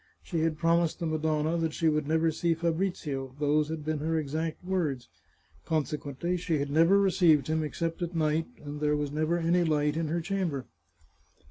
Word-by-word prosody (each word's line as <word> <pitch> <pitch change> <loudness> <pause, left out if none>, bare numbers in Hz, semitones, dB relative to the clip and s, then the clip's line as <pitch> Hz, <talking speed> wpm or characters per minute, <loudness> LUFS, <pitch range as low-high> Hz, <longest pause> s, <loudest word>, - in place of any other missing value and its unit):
She 170 - -2
had 160 -1 0
promised 170 0 +2
the 170 - -2
Madonna 155 0 0
that 160 -1 -1
she 165 - +1
would 150 -2 +1
never 160 +1 +2
see 165 +1 0
Fabrizio; 160 -6 -2
those 150 +1 +2
had 160 -2 -5
been 155 -1 -1
her 160 +2 0
exact 155 +3 -3
words. 155 -10 -1 0.6
Consequently 155 +2 -2
she 165 -2 -1
had 140 0 -2
never 165 +6 +5
received 175 -6 +4
him 160 0 0
except 165 +3 -3
at 175 0 -3
night, 155 0 +1 0.2
and 145 0 -6
there 150 0 +2
was 145 -1 -2
never 155 +3 0
any 170 +1 +2
light 150 -2 +1
in 165 0 -1
her 165 +3 -1
chamber. 170 -6 -2
160 Hz, 180 wpm, -29 LUFS, 150-170 Hz, 0.6 s, never